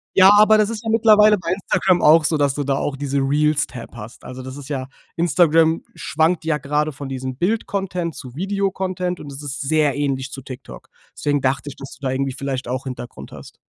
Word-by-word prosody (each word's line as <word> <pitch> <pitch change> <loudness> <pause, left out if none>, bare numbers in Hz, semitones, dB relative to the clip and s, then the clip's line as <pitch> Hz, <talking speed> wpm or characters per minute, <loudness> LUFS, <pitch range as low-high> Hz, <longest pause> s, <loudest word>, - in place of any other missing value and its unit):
Ja, 190 0 +8
aber 215 +1 +6
das 210 0 +2
ist 230 -1 -5
ja 225 - -1
mittlerweile 215 -2 +5
bei 170 -1 -5
Instagram 185 -1 +1
auch 155 +2 +7
so, 155 +1 +1
dass 140 -2 +2
du 145 - -2
da 135 0 0
auch 140 - -2
diese 140 0 -2
Reels-Tab 145 -3 0
hast. 115 0 -10
Also, 130 0 -8
das 130 +1 -8
ist 140 -1 -10
ja 135 -3 -3 0.3
Instagram 165 -1 +3
schwankt 160 +2 0
ja 155 -2 0
gerade 150 +2 -1
von 140 -1 -8
diesem 130 -1 -4
Bildcontent 180 - -2
zu 125 -2 -10
Videocontent. 185 -1 -2
Und 145 - -9
das 135 - -8
ist 145 0 -6
sehr 150 -1 +1
ähnlich 135 -2 -2
zu 135 - -8
TikTok. 130 -2 -10 0.3
Deswegen 145 -1 0
dachte 135 +2 -1
ich, 140 - -10
dass 135 0 -10
du - - -24
da 130 - 0
irgendwie 135 0 -1
vielleicht 135 -2 -4
auch 130 +2 -3
Hintergrund 125 -2 -8
hast. - - -12
150 Hz, 210 wpm, -21 LUFS, 135-180 Hz, 0.3 s, Ja